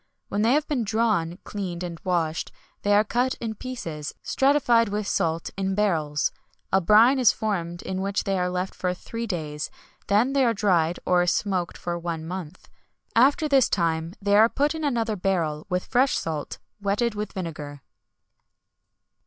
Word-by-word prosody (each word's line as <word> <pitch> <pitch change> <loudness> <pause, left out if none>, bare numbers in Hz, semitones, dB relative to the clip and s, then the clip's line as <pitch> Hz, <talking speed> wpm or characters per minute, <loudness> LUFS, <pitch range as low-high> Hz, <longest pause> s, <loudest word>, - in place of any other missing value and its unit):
When 205 - -1
they 230 +3 +4
have 295 +1 +1
been 270 -6 0
drawn, 215 -6 0
cleaned, 180 -4 -5
and 170 -2 -6
washed, 170 -4 -1 0.3
they 205 0 +3
are 210 - +5
cut 245 +4 0
in 225 -2 -4
pieces, 170 - -6
stratified 245 -5 +3
with 205 +1 -2
salt, 165 -4 -1
in 190 0 -1
barrels. 160 -8 +1 0.4
A 190 - +5
brine 225 +8 +6
is 245 -4 +6
formed 175 -5 -3
in 190 0 -3
which 195 0 -1
they 195 -1 0
are 180 0 0
left 180 +1 -2
for 180 -1 -2
three 230 +5 -6
days, 155 -6 -4 0.4
then 220 +7 +3
they 275 -1 +3
are 230 -2 +2
dried 175 -5 +2
or 180 -1 +3
smoked 180 -1 0
for 175 -1 -3
one 165 -2 -4
month. 175 -2 -7 0.5
After 280 +7 +4
this 270 -4 +4
time 165 -1 0
they 200 0 +2
are 220 +2 +6
put 290 +5 +1
in 320 -1 -5
another 230 -6 0
barrel, 170 -6 -1
with 180 -1 -1
fresh 260 +2 +2
salt, 155 -3 -4 0.2
wetted 205 +4 0
with 210 0 -5
vinegar." 150 -6 -6
195 Hz, 170 wpm, -25 LUFS, 170-230 Hz, 0.5 s, brine